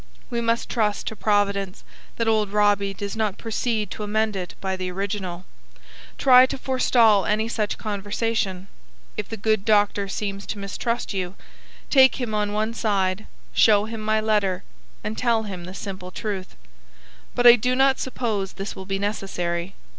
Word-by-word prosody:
We 235 -1 -1
must 230 0 0
trust 210 -4 0
to 220 - -4
Providence 200 -2 0 0.3
that 230 - -1
old 215 -2 +2
Robbie 205 -1 +2
does 200 +1 -5
not 215 -3 -1
proceed 225 -1 -2
to - - -6
amend 215 0 0
it 180 -2 -5
by 190 -1 -2
the 185 -1 -4
original. 185 -1 -4 0.7
Try 255 -1 +7
to - - -4
forestall 240 -6 +3
any 215 +1 +1
such 215 -2 -2
conversation. 205 -2 -2 0.5
If - - -4
the 225 - -5
good 215 -1 +1
doctor 205 -1 +2
seems 200 0 -4
to - - -4
mistrust 210 +4 -3
you, 185 -1 -3 0.6
take 265 -2 +6
him 240 -4 -3
on 210 -1 0
one 215 +2 -1
side, 200 -3 0 0.3
show 210 -2 +5
him 225 0 -6
my 215 0 +1
letter, 205 -4 +1 0.4
and 215 +1 -3
tell 230 -3 +2
him 185 -4 -6
the 185 +2 -9
simple 190 -2 -6
truth. 190 0 -5 0.8
But 245 - +1
I 240 0 +11
do 250 +2 0
not 270 0 +3
suppose 220 -7 -2
this 195 +1 -6
will 190 - -8
be 195 0 -1
necessary. 190 -3 -3
210 Hz, 165 wpm, -24 LUFS, 195-225 Hz, 0.8 s, I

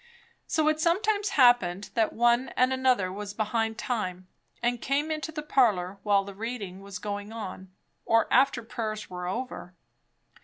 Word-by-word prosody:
So 315 -2 +1
it 310 0 +2
sometimes 405 +5 +1
happened 205 -8 +4
that 225 -2 +2
one 240 +2 +2
and 255 +1 +4
another 255 -8 +2
was 205 0 -6
behind 225 +1 -1
time, 185 -7 -3 0.4
and 240 0 0
came 290 +3 0
into 310 +1 -3
the 300 -1 -5
parlour 200 -10 +2
while 200 -2 +3
the 200 0 -9
reading 205 -3 -5
was 200 -1 -7
going 205 +1 -5
on, 190 -4 -7 0.3
or 225 0 +3
after 260 -2 +4
prayers 220 -3 -5
were 180 0 -5
over. 190 -3 -5
225 Hz, 155 wpm, -28 LUFS, 200-260 Hz, 0.4 s, happened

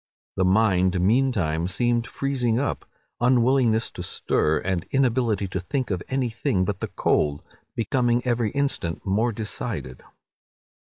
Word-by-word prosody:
The 95 - +1
mind, 95 -2 +3
meantime, 95 -6 +1
seemed 120 +4 0
freezing 125 -3 -1
up; 140 +2 -2 0.3
unwillingness 120 -2 +3
to - - -7
stir, 75 +1 0
and 90 0 -2
inability 120 -6 +1
to 95 - -3
think 125 +7 -3
of 90 -2 -1
any 130 -3 0
thing 100 -4 0
but 100 0 -3
the - - -3
cold, 75 -1 0 0.3
becoming 120 +2 +1
every 120 -3 +1
instant 135 -12 -2
more 110 +5 +1
decided. 100 - -5
110 Hz, 135 wpm, -24 LUFS, 95-125 Hz, 0.3 s, mind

